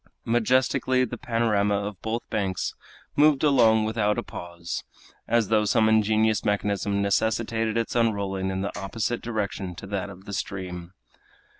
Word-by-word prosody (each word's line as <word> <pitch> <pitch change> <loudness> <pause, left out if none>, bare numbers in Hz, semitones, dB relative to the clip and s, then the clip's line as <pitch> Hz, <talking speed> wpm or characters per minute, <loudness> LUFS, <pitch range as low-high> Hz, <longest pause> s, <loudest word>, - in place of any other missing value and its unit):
Majestically 130 +2 +2
the 120 - -6
panorama 105 -3 +1
of 100 -1 -4
both 115 +2 -3
banks 95 -3 -1 0.4
moved 150 -1 +4
along 115 -7 +5
without 105 -1 +1
a - - -1
pause, 85 0 -6 0.4
as 115 -3 +2
though 110 -1 +3
some 110 +1 +3
ingenious 110 0 +3
mechanism 100 -1 0
necessitated 110 +2 0
its 115 +1 -1
unrolling 100 -5 0
in 95 0 -2
the 100 - -3
opposite 110 +5 -2
direction 100 -5 -3
to 100 - -9
that 100 0 -3
of 95 0 -12
the 100 - -7
stream. 90 -3 -5
105 Hz, 145 wpm, -26 LUFS, 100-115 Hz, 0.4 s, along